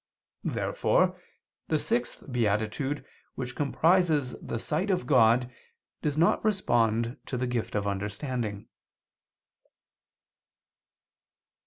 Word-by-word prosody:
Therefore 185 - +1 0.5
the 155 - +2
sixth 120 -4 -1
beatitude 115 +5 0 0.3
which 125 -1 -5
comprises 155 -2 +2
the - - -4
sight 160 - -1
of 185 -2 +1
God, 125 -2 +4 0.5
does 150 -1 -1
not 165 +2 +3
respond 120 - +1
to 125 - -2
the 125 - 0
gift 120 -3 -2
of 105 -1 0
understanding. 105 +2 -3
125 Hz, 95 wpm, -28 LUFS, 115-155 Hz, 0.5 s, God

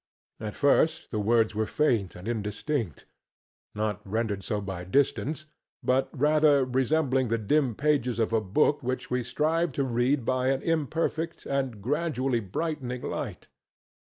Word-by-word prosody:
At 105 -1 -5
first 155 +3 +2
the 110 - -1
words 110 +1 +2
were 110 +1 -1
faint 115 -9 +1
and 90 +4 -9
indistinct—not 105 - -4
rendered 105 -1 -2
so 105 - -1
by 95 -3 -5
distance, 140 - 0 0.4
but 130 +1 +2
rather 150 -1 +4
resembling 130 +1 +1
the 115 +1 +1
dim 125 +2 +1
pages 140 -4 +1
of 115 -1 0
a 110 - +3
book 145 +9 +2
which 130 0 -3
we 125 0 +1
strive 155 +5 0
to 140 - 0
read 125 +1 +1
by 130 +1 +1
an 135 +1 +1
imperfect 165 +1 -1
and 130 -7 -2
gradually 135 -2 0
brightening 125 - -3
light. - - -5
125 Hz, 140 wpm, -27 LUFS, 110-150 Hz, 0.4 s, rather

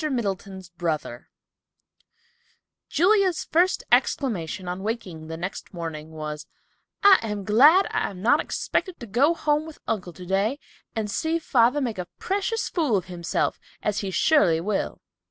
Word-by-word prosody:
MIDDLETON'S 195 -6 -3
BROTHER 155 -8 -3 1.6
Julia's 370 +1 +3
first 355 +3 +2
exclamation, 190 - +1
on 180 +1 -4
waking 190 -7 -5
the 160 0 -6
next 185 +2 -6
morning, 160 -2 -6
was, 155 -1 -6 0.6
"I 400 -1 +8
am 210 -3 -4
glad 290 - +6
I - - 0
am 190 - -10
not 240 +10 +4
expected 370 -3 -2
to 240 - -7
go 265 +10 +2
home 300 -1 0
with 320 - -10
uncle 190 -5 -2
today, 195 +8 -1 0.4
and 220 -2 -1
see 320 +10 0
father 260 -3 +2
make 230 -7 -2
a 180 - -4
precious 405 +4 -1
fool 295 - +1
of 180 - -3
himself, 175 -2 -2 0.2
as 210 0 0
he 200 - -3
surely 185 - +3
will." 195 +4 -2
210 Hz, 145 wpm, -25 LUFS, 180-300 Hz, 1.6 s, I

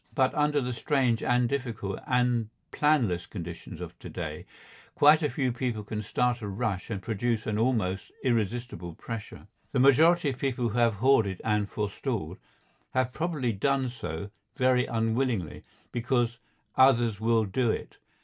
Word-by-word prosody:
But 130 -2 +3
under 150 -1 +2
the 125 -1 -2
strange 125 -2 +1
and 125 0 +2
difficult 115 -7 -3
and 125 -3 +1 0.2
planless 125 - +2
conditions 85 -4 -7
of - - -8
to - - -9
day - - -6 0.5
quite 150 +2 +6
a 150 - +1
few 130 0 0
people 120 -3 -2
can 105 +1 -4
start 120 +3 0
a 105 - -4
rush 100 -1 -2
and 100 -4 -4
produce 115 +1 -1
an 105 0 -1
almost 110 -6 0
irresistible 115 -7 -1
pressure. 115 +2 -7 0.3
The - - +2
majority 155 +5 +5
of 130 - -5
people 125 -3 0
who 110 - -4
have 115 -2 +3
hoarded 105 -5 +3
and 105 -2 +1
forestalled 105 - -3 0.6
have 130 -1 +1
probably 150 -7 -1
done 135 +5 +1
so 100 -6 -6 0.2
very 125 -1 +3
unwillingly, 115 - -1 0.3
because 120 -1 0 0.4
"others 120 -5 +4
will 115 0 +2
do 115 +5 0
it." - - -3
120 Hz, 150 wpm, -28 LUFS, 105-130 Hz, 0.6 s, quite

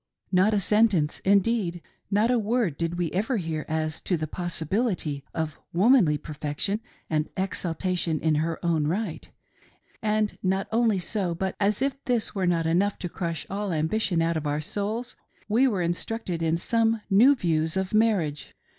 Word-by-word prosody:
Not 195 +3 +4
a - - +3
sentence; 200 -7 +2
indeed, 200 -2 +2 0.3
not 210 +4 +3
a 245 - +3
word 220 - 0
did 165 +2 -2
we 175 -3 -1
ever 220 +7 0
hear 160 -4 -3
as 155 0 -2
to 180 - 0
the 155 - -2
possibility 175 - -2
of 160 -2 -3
womanly 190 - +5
perfection 150 +8 -3 0.3
and 155 -1 -1
exaltation 180 -3 -1
in 160 -1 +1
her 165 0 -1
own 160 -3 +2
right; 185 +1 -3 0.7
and 215 -1 0
not 190 +1 0
only 225 -2 +3
so, 180 -1 -2
but, 190 +2 -2
as 210 +4 +1
if 275 0 -2
this 240 -3 +1
were 190 -3 0
not 170 -2 +1
enough 185 +5 +1
to 180 - -5
.crush 170 -2 -4
all 200 0 -3
ambition 165 +2 +1
out 165 0 +1
of 150 -1 -3
our 145 +1 0
souls, 210 +9 -3 0.3
we 235 +5 +4
were 200 -8 0
instructed 175 +1 -3
in 165 0 +1
some 225 +3 +1
new 245 +9 +7
views 160 - 0
of 190 +1 -2
marriage. 200 -10 +1
185 Hz, 165 wpm, -26 LUFS, 165-215 Hz, 0.7 s, new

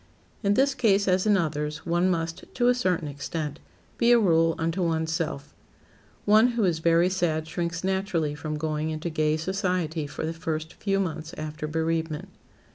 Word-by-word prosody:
In 200 -1 +2
this 270 +3 +3
case, 205 -6 +2
as 185 +2 +2
in 205 -1 +5
others, 150 -3 -2
one 175 +2 +2
must, 165 -2 -2
to 245 -1 +2
a 250 - +6
certain 185 -9 0
extent, 150 +1 -4 0.4
be 235 +1 +5
a 240 - +8
rule 165 -6 +3
unto 165 +3 -1
one's 160 -2 0
self. 155 -3 -3 0.7
One 215 +3 +6
who 225 - +2
is 175 -4 +2
very 170 +2 +4
sad 170 -4 0
shrinks 170 0 -3
naturally 190 -5 0
from 155 0 -4
going 155 0 -2
into 160 +2 -3
gay 155 0 +1
society 175 -3 -1
for 150 - -5
the 160 - -2
first 160 -1 -4
few 195 -1 -1
months 160 -4 -3
after 155 0 -5
bereavement. 160 0 -2
165 Hz, 175 wpm, -26 LUFS, 155-190 Hz, 0.7 s, a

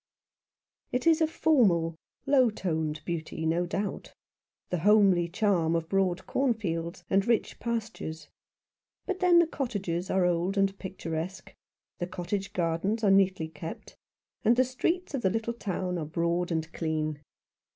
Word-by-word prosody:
It 250 - -1
is 330 0 +5
a 320 - +4
formal, 195 - +3 0.3
low 270 -3 +5
toned 160 -7 -2
beauty, 160 -1 -4
no 170 +2 +1
doubt, 195 +2 -4 0.6
the 180 - 0
homely 195 -2 +5
charm 175 -4 +1
of 165 -1 -1
broad 190 -2 +1
cornfields, 190 -10 -1
and 195 0 +3
rich 235 -2 +1
pastures; 220 -10 -4 0.8
but 380 -2 -3
then 360 -2 +5
the 340 - +7
cottages 195 - -3
are 190 -1 +2
old 180 +3 0
and 195 0 +2
picturesque, 180 -1 -5 0.5
the 175 - -2
cottage 190 +2 -3
gardens 180 +6 -1
are 200 - +5
neatly 190 -4 +3
kept, 160 +1 -8 0.5
and 230 +1 +5
the 255 - +5
streets 330 +8 -1
of 270 - -1
the 190 - +3
little 225 +3 -2
town 185 -5 -3
are 155 - -3
broad 170 +3 -1
and 160 0 -2
clean. 155 -2 -2
190 Hz, 145 wpm, -28 LUFS, 165-225 Hz, 0.8 s, the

